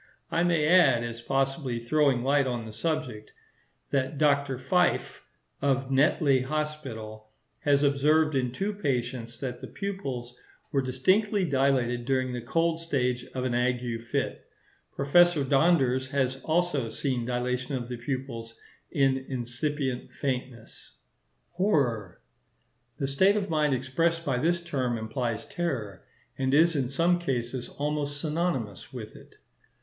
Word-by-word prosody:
I 170 - +2
may 170 -4 +2
add, 150 -9 +5
as 115 0 -5
possibly 135 0 -1
throwing 130 +1 +2
light 140 0 +3
on 120 -2 -3
the 110 - -9
subject, 130 -6 -3 0.6
that 135 +1 0
Dr. 140 -2 +2
Fyffe, 180 +6 +1 0.4
of 135 -1 +1
Netley 140 -1 +3
Hospital, 130 -7 -4 0.3
has 140 0 +3
observed 150 +2 +3
in 125 -3 0
two 195 +11 -2
patients 120 - -3
that 125 -3 -4
the - - -6
pupils 135 -12 -5 0.4
were 135 - +2
distinctly 185 - +2
dilated 130 -4 +1
during 130 -1 0
the 120 - -3
cold 165 +7 0
stage 125 -6 -1
of 130 - -1
an 130 -2 -1
ague 120 -1 0
fit. 120 - -3 0.5
Professor 170 +2 +4
Donders 135 -3 +3
has 130 -1 0
also 175 -1 +1
often - - -7
seen 130 0 -2
dilatation 125 +2 -2
of 120 -2 -4
the 125 0 -5
pupils 120 -2 -5 0.3
in 135 -2 +2
incipient 130 +1 -3
faintness. 125 -4 -5 0.6
Horror.—The 120 - -3
state 190 +9 +4
of 200 -4 -2
mind 150 -3 +2
expressed 165 +6 0
by 130 -3 0
this 170 +5 +2
term 130 -8 -1
implies 115 0 -3
terror, 125 - -3 0.4
and 135 +1 +2
is 165 +2 +5
in 130 -4 0
some, 170 +5 +2
cases 125 -5 -3
almost 145 0 -3
synonymous 150 - -2
with - - -8
it. - - -15
135 Hz, 135 wpm, -28 LUFS, 125-155 Hz, 0.6 s, add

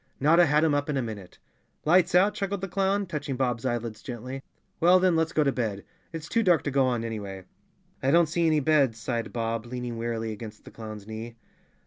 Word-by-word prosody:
Notta 165 +4 +5
had 150 +2 +3
him 160 -2 +3
up 145 +1 0
in 145 - 0
a - - +1
minute. 100 -6 -8 0.5
"Lights 175 +2 +4
out?" 195 +3 +5
chuckled 200 -2 -3
the 195 - -3
clown, 195 +2 0
touching 145 -5 -4
Bob's 125 -1 -1
eyelids 115 -3 -3
gently. 125 +2 -6 0.4
"Well, 180 +2 +6
then, 180 -2 +3
let's 160 0 +1
go 155 - +2
to 140 - +2
bed. 110 -6 -3 0.3
It's 165 -1 -6
too 230 - +1
dark 180 -6 +3
to 145 - -2
go 135 -1 +3
on, 120 -2 0
anyway." 100 -4 -5 0.6
"I 130 - +1
don't 170 +4 +5
see 165 +2 0
any 155 -2 +3
beds," 140 -6 +3
sighed 115 0 -3
Bob, 115 0 -2
leaning 125 -1 -5
wearily 115 -1 -2
against 110 0 -9
the - - -11
clown's 110 -2 -8
knee. 110 +2 -7
130 Hz, 210 wpm, -27 LUFS, 115-165 Hz, 0.6 s, Well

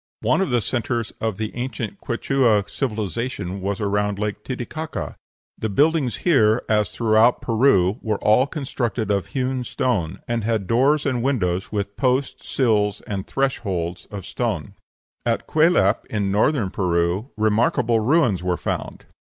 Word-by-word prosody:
One - - +2
of 190 - 0
the 120 -2 +2
centres 120 -2 -2
of 110 -4 -1
the 110 0 -4
ancient 120 -3 -4
Quichua 120 -4 +1
civilization 105 -5 -3
was 100 0 -2
around 105 0 0
Lake 105 0 -3
Titicaca. 135 +5 -5 0.4
The 110 - -2
buildings 145 +3 +2
here, 120 -9 +4
as 105 -1 +2
throughout 115 +1 +3
Peru, 110 -4 +3
were 110 -2 -1
all 110 +7 +3
constructed 125 -7 -2
of 100 -2 0
hewn 130 -1 -2
stone, 100 -9 -1
and 120 -2 -1
had 110 -2 0
doors 135 +8 +2
and 130 -4 0
windows 105 -7 0
with 100 -1 -3
posts, 130 0 0
sills, 105 -5 +1
and 95 -2 -5
thresholds 95 -10 -2
of 100 -3 -7
stone. - - -3 0.5
At - - 0
Cuelap, 155 - +3
in 100 -2 -1
Northern 105 0 +2
Peru, 90 +5 0
remarkable 110 +2 +2
ruins 120 - +2
were 90 -1 0
found. - - -4
110 Hz, 145 wpm, -22 LUFS, 100-130 Hz, 0.5 s, here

